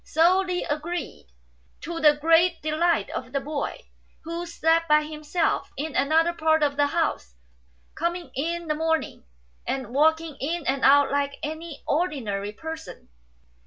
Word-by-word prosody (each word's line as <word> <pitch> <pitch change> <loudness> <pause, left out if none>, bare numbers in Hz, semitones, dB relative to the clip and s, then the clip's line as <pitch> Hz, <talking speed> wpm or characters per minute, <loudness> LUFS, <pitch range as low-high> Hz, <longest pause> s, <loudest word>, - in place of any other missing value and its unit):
So 345 +4 +3
Li 365 -2 -1
agreed, 310 +3 -4 0.5
to 335 +1 -5
the 300 -2 +5
great 330 +3 +4
delight 315 +2 +1
of 250 0 -6
the 275 - +1
boy, 285 +1 -4 0.4
who 335 +2 -5
slept 330 0 +1
by 300 0 +5
himself 305 +2 -2
in 305 +1 -4
another 325 +4 +3
part 315 -1 +2
of 285 -1 +1
the 290 0 +3
house, 285 - -2 0.6
coming 345 +1 -3
in 335 +5 -2
the 305 - +1
morning 320 +1 -1 0.4
and 260 -3 -3
walking 320 +1 +2
in 325 +3 -2
and 270 +1 -1
out 285 +1 +6
like 280 0 0
any 315 0 -6
ordinary 240 - -1
person. 320 +7 -8
315 Hz, 145 wpm, -25 LUFS, 285-335 Hz, 0.6 s, out